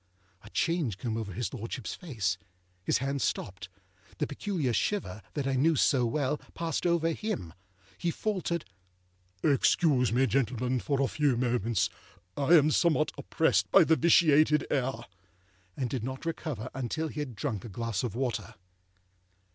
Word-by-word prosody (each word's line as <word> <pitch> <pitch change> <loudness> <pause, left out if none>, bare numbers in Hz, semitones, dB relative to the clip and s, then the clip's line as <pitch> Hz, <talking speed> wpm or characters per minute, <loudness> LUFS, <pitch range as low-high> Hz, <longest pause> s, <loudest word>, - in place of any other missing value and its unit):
A 105 - -12
change 160 - 0
came 115 0 -3
over 110 -3 -4
his 115 +6 -3
Lordshipâs 115 -1 -5
face; 105 - -2 0.4
his - - +2
hand 135 +1 -2
stopped; 90 -5 -3 0.5
the - - 0
peculiar 150 - -2
shiver, 110 - -1
that 145 -3 -1
I 135 - 0
knew 155 +5 +3
so 130 -4 +3
well, 145 +3 0 0.2
passed 165 +1 -1
over 165 -1 +2
him; 170 - -4 0.5
he 175 - 0
faltered, 175 -3 -2 0.8
âExcuse 140 -2 +3
me, 130 +3 +3
gentlemen, 125 0 0
for 140 +2 0
a - - +2
few 145 -4 +1
moments. 120 -4 +1 0.5
I 145 +4 +4
am 155 -1 +5
somewhat 155 -2 +2
oppressed - - +1
by - - +7
the 160 - +4
vitiated 155 -2 +5
air;â 135 -1 -1 0.7
and 130 - -1
did 120 -1 -3
not 130 +5 -5
recover 150 -8 -4
until 135 +5 -2
he 150 - -6
had 135 -6 -4
drunk 105 -1 -3
a 115 - -7
glass 115 0 -2
of 120 -3 -3
water. 120 -6 -2
135 Hz, 155 wpm, -29 LUFS, 115-155 Hz, 0.8 s, by